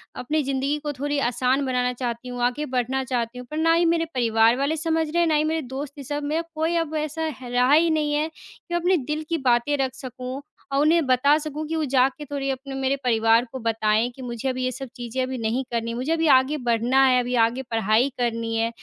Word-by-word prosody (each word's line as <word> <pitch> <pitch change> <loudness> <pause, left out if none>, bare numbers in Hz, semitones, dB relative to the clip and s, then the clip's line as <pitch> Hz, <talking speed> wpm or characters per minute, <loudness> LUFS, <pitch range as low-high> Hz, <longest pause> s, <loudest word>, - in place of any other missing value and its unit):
अपनी 305 +5 -1
जिंदगी 275 +2 -1
को 295 - -2
थोड़ी 290 +2 -2
आसान 260 +3 +1
बनाना 250 -1 0
चाहती 240 0 -4
हूँ, 245 0 -5
आगे 255 +5 0
बढ़ना 255 +1 -1
चाहती 245 -1 -2
हूँ। 250 - -10
पर 305 - -4
ना 330 +1 +3
ही 340 +1 +3
मेरे 330 0 +2
परिवार 230 -1 +3
वाले 285 +4 0
समझ 320 0 0
रहे 340 +2 0
हैं, 335 - +3
ना 310 - +2
ही 300 - +3
मेरे 320 +1 0
दोस्त, 270 +2 -6
ये 280 - -7
सब 290 +2 -4
मेंरा 315 +3 -1
कोई 320 +2 0
अब 315 -2 -2
ऐसा 310 +1 -2
ह - - -8
रहा 250 +2 +2
ही 330 +2 +5
नहीं 300 -2 +1
है 300 +2 +1
कि 345 - -13
अपने 355 +2 +2
दिल 300 +2 -3
की 335 - +1
बातें 250 +1 +2
रख 265 -1 -1
सकूँ 255 +1 -7 0.3
और 275 - +1
उन्हें 320 0 +3
बता 280 +4 +4
सकूँ 305 0 -5
कि 325 - -3
वो 320 - 0
जाके 270 +3 +2
थोड़ी 280 -1 -3
अपने 270 +1 -6
मेरे 270 +1 0
परिवार 225 0 +3
को 260 - -6
बताएँ 225 0 +1
कि 265 - -11
मुझे 245 +1 -3
अभी 255 0 -2
ये 255 - 0
सब 265 +1 -7
चीजें 245 +1 -4
अभी 260 0 -3
नहीं 230 +3 -1
करनी 230 -1 -2
है, - - -4
मुझे 255 +6 -2
अभी 325 -1 +1
आगे 270 +2 +4
बढ़ना 245 +1 +2
है, 255 -1 +4
अभी 245 0 -1
आगे 245 +3 -3
पढ़ाई 225 +4 +2
करनी 230 -1 -1
है। 225 0 +1
265 Hz, 240 wpm, -24 LUFS, 245-300 Hz, 0.3 s, ही